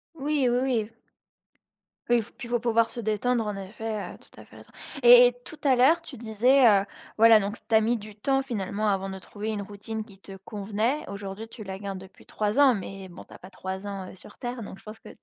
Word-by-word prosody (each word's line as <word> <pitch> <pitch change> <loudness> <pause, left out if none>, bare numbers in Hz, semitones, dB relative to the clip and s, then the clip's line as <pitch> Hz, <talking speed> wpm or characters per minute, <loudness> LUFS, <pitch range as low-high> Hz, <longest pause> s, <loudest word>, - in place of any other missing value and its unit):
Oui, 290 -2 0
oui, 245 - +2
oui. 230 -4 -1 1.2
Oui 240 -1 +3
f - - -18
puis 240 - -10
il - - -12
faut 240 - +2
pouvoir 230 -1 +2
se 240 - -8
détendre 225 +2 0
en 210 -1 -3
effet, 205 0 -5
heu, - - -13
tout - - -17
à - - -12
fait - - -19
raison - - -16 0.3
et 240 0 +10
et 245 - -1
tout 310 - -11
à 265 -3 +4
l'heure, 310 +7 +4
tu 290 -6 -11
disais, 240 +4 +3
heu, 200 -2 +5 0.3
voilà, 225 -1 +7
donc 205 +3 -4
tu 225 - +2
as 220 - +6
mis 235 +2 +1
du 210 -1 -11
temps 270 +5 +1
finalement 215 -4 -3
avant 195 0 -1
de 190 - -7
trouver 210 +3 -6
une 210 -2 -2
routine 210 +2 -6
qui 200 -3 -17
te 195 0 -11
convenait. 215 +7 -2
Aujourd'hui, 200 +2 -7
tu 225 -1 -10
la 190 -1 -6
gardes 195 -2 -6
depuis 190 0 -15
3 210 +5 -1
ans, 270 -3 +7
mais 195 -1 -7
bon 175 - -11
tu - - -16
as - - -11
pas 185 - -13
3 190 +1 -6
ans, 195 -2 -6
heu, - - -12
sur 180 - -15
terre. 245 -2 -5
Donc 195 - -10
je - - -22
pense 215 +1 -10
que, - - -13
215 Hz, 250 wpm, -26 LUFS, 200-240 Hz, 1.2 s, et